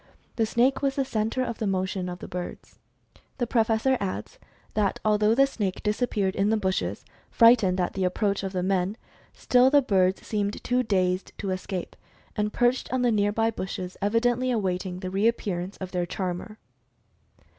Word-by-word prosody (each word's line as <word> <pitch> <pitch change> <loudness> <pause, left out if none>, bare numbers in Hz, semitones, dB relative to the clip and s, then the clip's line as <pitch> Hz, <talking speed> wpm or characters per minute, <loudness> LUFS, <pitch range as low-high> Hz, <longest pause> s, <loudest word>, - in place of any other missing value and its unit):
The 225 -2 +1
snake 255 +4 +2
was 275 -1 0
the 275 - 0
center 225 +2 -1
of 235 -3 -4
the 215 - -1
motion 190 -1 -1
of 175 - -5
the - - -9
birds. 180 0 -7 0.6
The 245 - 0
Professor 230 +2 +2
adds 200 - -5 0.3
that 205 -3 0
although 210 +1 +3
the 275 +2 +6
snake 205 -8 -3
disappeared 210 -3 0
in 200 +1 +2
the 220 - +2
bushes, 190 -3 -2 0.2
frightened 225 -6 +5
at 180 - 0
the 190 - -2
approach 200 +2 0
of 195 -1 -4
the 180 -2 -2
men, 190 +2 0 0.3
still 250 +1 +3
the 285 0 +5
birds 190 -4 +1
seemed 205 -1 -2
too 250 +1 +1
dazed 185 -5 0
to 195 - -3
escape, 185 0 -4 0.4
and 210 0 0
perched 245 +3 +1
on 255 -1 0
the 245 - +3
near 205 -1 +2
by 225 +2 +1
bushes, 185 -3 -5
evidently 240 +4 +1
awaiting 185 -5 -2
the 185 -1 -4
reappearance 195 -3 -1
of 185 -1 -6
their 180 -1 -1
"charmer." 185 +4 -4
205 Hz, 175 wpm, -26 LUFS, 185-230 Hz, 0.6 s, the